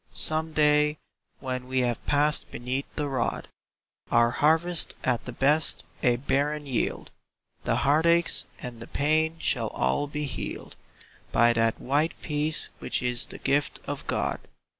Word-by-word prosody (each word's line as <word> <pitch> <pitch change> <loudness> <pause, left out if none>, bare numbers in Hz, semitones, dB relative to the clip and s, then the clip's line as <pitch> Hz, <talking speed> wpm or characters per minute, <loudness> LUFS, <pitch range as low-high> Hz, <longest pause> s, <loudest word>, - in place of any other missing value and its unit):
Some 160 0 0
day, 150 0 +3 0.4
when 130 -1 -4
we 130 0 +1
have 120 -2 -1
passed 145 +1 +2
beneath 130 +3 -3
the 150 - -1
rod. 130 -4 -2 0.6
Our 120 0 +4
harvest 160 +5 +2
at 125 -2 0
the 125 - -5
best 145 +5 +2 0.2
a 120 -1 +4
barren 145 +3 -1
yield, 130 -5 -2 0.5
The - - +2
heartaches 170 +4 +3
and 120 -2 -7
the - - -8
pain 155 +2 +1
shall 160 - 0
all 65 - 0
be 150 +1 -3
healed 135 - -6 0.6
By 120 +1 +4
that 115 0 +1
white 145 +5 0
peace 150 0 0
which - - -2
is 125 0 +1
the - - -8
gift 140 +1 0
of - - -5
God. - - -1
145 Hz, 145 wpm, -27 LUFS, 125-150 Hz, 0.6 s, Our